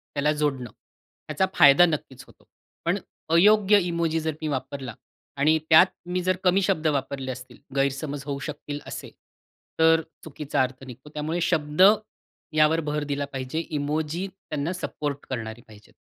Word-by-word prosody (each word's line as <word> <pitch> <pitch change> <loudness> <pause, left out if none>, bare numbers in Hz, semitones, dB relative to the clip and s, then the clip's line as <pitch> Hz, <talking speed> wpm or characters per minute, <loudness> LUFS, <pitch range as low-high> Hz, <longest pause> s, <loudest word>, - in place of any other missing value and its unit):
त्याला 145 +1 +2
जोडणं 135 -5 -1
ह्याचा 155 +5 -5
फायदा 140 +5 +8
नक्कीच 140 -5 -4
होतो. - - -21 0.4
पण - - +2 0.4
अयोग्य 205 +3 +6
इमोजी 170 -2 0
जर 160 0 -1
मी 155 - -2
वापरला 135 -3 -4 0.4
आणि 155 +3 +4
त्यात 160 +4 +8 0.2
मी 180 +1 -2
जर 185 +1 +2
कमी 190 +1 +4
शब्द 160 -3 +1
वापरले 135 -2 -2
असतील, 125 0 -10 0.2
गैरसमज 140 +1 -1
होऊ 140 -1 -3
शकतील 145 0 -6
असे, - - -7 0.7
तर 160 0 +5 0.2
चुकीचा 150 -3 -2
अर्थ 130 +1 -5
निघतो. 130 +4 -11
त्यामुळे 155 +3 -2
शब्द 160 -2 0 0.7
यावर 155 +1 +4
भर 150 0 -1
दिला 145 -1 -2
पाहिजे. 130 +4 -3
इमोजी 155 +4 -2
त्यांना 165 -4 -5
सपोर्ट 145 -5 -4
करणारी 115 -2 -5
पाहिजे. 105 -1 -17
150 Hz, 145 wpm, -25 LUFS, 135-165 Hz, 0.7 s, फायदा